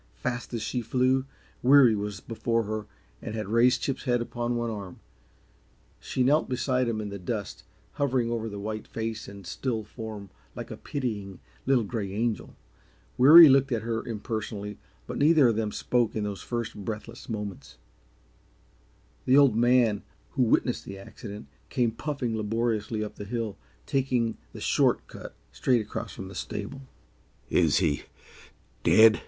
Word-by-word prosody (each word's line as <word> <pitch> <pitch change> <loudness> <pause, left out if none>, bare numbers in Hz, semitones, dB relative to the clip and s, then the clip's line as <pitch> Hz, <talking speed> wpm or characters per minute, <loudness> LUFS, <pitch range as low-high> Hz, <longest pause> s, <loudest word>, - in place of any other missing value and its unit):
Fast 120 - -4
as 115 - -3
she 115 +4 -2
flew, 130 +3 +1 0.4
Weary 130 -2 +7
was 100 -2 -4
before 115 0 -1
her 110 0 -4 0.3
and 110 - -5
had 110 -2 -3
raised 120 +3 +4
Chip's 135 - -2
head 120 -2 +2
upon 120 0 -2
one 120 -1 -1
arm. 100 -4 -7 1.0
She 130 - -1
knelt 145 +5 +3
beside 130 0 +1
him 115 -2 -1
in 105 -1 -4
the 100 0 -6
dust, 100 +2 -4 0.3
hovering 125 - 0
over 115 -1 -2
the 100 - -7
white 110 +1 -5
face 110 -1 -4
and 100 -1 -10
still 115 +2 -2
form 105 -3 -8 0.2
like - - -7
a - - -4
pitying, 105 - -4 0.3
little 130 -3 +4
gray 105 -3 -3
angel. 115 +1 -2 0.6
Weary 155 +6 +10
looked 135 0 +4
at 115 -3 0
her 115 0 -2
impersonally, 110 -3 -5 0.3
but - - -5
neither 150 -3 +6
of 115 - +1
them 110 -1 -1
spoke 120 0 0
in 110 - -1
those 100 -2 -4
first, 120 -2 -3
breathless 115 +4 -6
moments. 105 - -6 1.5
The 130 +2 +5
Old 140 -6 +6
Man, 120 -3 +3 0.3
who 135 - -1
had - - 0
witnessed 125 - +2
the 100 - -7
accident, 105 +2 -9 0.2
came 120 -4 +1
puffing 125 -2 -3
laboriously 110 0 -1
up 105 - -7
the - - -6
hill, 115 -1 -3 0.3
taking 125 - 0 0.2
the - - -10
short - - +2
cut - - -10 0.2
straight 125 -3 +2
across 105 - -5
from 95 - -7
the 95 - -10
stable. 110 +8 -5 0.7
"Is 80 -4 +4
he 80 -6 +1 0.8
DEAD?" 110 0 +6
115 Hz, 160 wpm, -27 LUFS, 105-125 Hz, 1.5 s, Weary